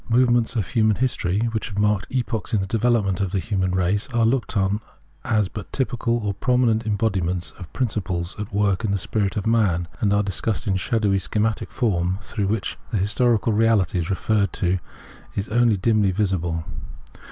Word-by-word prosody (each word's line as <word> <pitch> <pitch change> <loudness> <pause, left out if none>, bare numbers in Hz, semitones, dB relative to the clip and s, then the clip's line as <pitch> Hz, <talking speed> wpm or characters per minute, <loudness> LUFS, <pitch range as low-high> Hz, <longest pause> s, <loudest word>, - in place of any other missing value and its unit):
Movements 120 0 +3
of 110 -5 0
human 110 +4 +2
history 105 -6 0
which 110 -1 -2
have 100 - -7
marked 105 0 +1
epochs 115 -5 -2
in - - +3
the 95 - -1
development 105 -3 +1
of 100 - 0
the 100 - 0
human 95 -2 0
race 95 +5 0
are 120 -2 +2
looked 125 +2 0
upon 100 +1 +1 0.4
as 105 -3 +1
but 100 +1 -8
typical 120 -3 0
or 100 - 0
prominent 115 0 +1
embodiments 95 -5 -1
of 90 - -9
principles 95 -8 -2
at 105 - -5
work 100 0 +1
in 110 - 0
the 100 - +1
spirit 100 +2 -1
of 100 - -2
man, 100 -7 +2
and 100 - +1
are 100 0 +3
discussed 100 +3 -2
in 95 -3 +1
shadowy, 100 0 +1
schematic 110 +3 -1
form, 95 -7 0
through 100 0 -3
which 110 +1 -2
the 110 - -1
historical 110 +3 +2
reality 105 -5 +2
referred 100 +2 0
to 95 -1 0 0.6
is 100 +2 -2
only 115 -1 +3
dimly 105 0 +2
visible. 90 -4 -1
105 Hz, 175 wpm, -23 LUFS, 95-115 Hz, 0.6 s, Movements